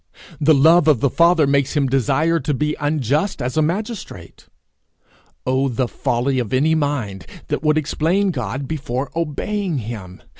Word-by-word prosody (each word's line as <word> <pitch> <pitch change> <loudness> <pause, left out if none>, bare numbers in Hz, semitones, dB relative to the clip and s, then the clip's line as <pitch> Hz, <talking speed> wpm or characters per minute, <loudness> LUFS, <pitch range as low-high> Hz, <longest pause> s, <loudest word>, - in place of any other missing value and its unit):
The 155 +1 +4
love 160 +4 +5
of 150 -7 +4
the 140 0 +1
father 170 -2 +4
makes 140 +1 +1
him 140 - +2
desire 140 +5 +1
to 150 -2 -2
be 150 +3 -1
unjust 145 - 0
as 125 -1 -3
a 155 - +3
magistrate! 175 - -5 1.0
Oh 130 +1 +1
the 125 +1 -1
folly 125 +3 -1
of 120 -4 -3
any 150 +5 +3
mind 130 - -2 0.2
that - - -1
would 155 0 +2
explain 165 +6 +1
God 130 - -4
before 135 -3 -4
obeying 170 +3 -2
him! 105 -6 -7
145 Hz, 155 wpm, -20 LUFS, 130-160 Hz, 1.0 s, love